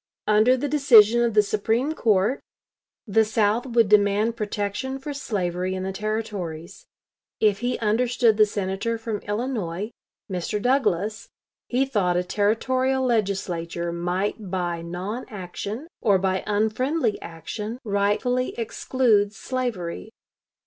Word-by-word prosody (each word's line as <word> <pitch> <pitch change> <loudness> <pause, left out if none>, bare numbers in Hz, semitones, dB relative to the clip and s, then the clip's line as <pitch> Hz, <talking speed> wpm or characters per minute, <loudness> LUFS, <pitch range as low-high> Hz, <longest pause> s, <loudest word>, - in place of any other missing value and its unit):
Under 215 +5 +4
the 290 - -2
decision 240 -6 +6
of 235 -2 +1
the 210 - +6
Supreme 225 +8 0
Court 215 -1 +2 0.6
the 220 0 +3
South 220 +2 +1
would 230 -3 +3
demand 210 +2 +3
protection 210 +4 -3
for 285 +2 -6
slavery 185 -8 -2
in 185 - -3
the 190 0 -3
Territories. 200 -5 -4 0.5
If 205 -2 +3
he 245 +1 -1
understood 230 +1 +2
the 215 -1 +6
Senator 205 +3 -2
from 225 -2 -4
Illinois, 210 -3 -3 0.4
Mr. 185 +2 -2
Douglas, 215 -4 0 0.4
he 255 +2 +1
thought 195 -9 +1
a 180 - +1
Territorial 255 +7 +1
Legislature 180 -7 -1
might 180 +4 -2
by 175 -2 -2
non 185 +8 -5
action 205 - -6
or 205 -4 +4
by 190 0 0
unfriendly 220 +4 0
action 205 +8 -6
rightfully 210 +4 0
exclude 225 -3 +1
slavery. 220 -7 -4
210 Hz, 120 wpm, -24 LUFS, 190-240 Hz, 0.6 s, decision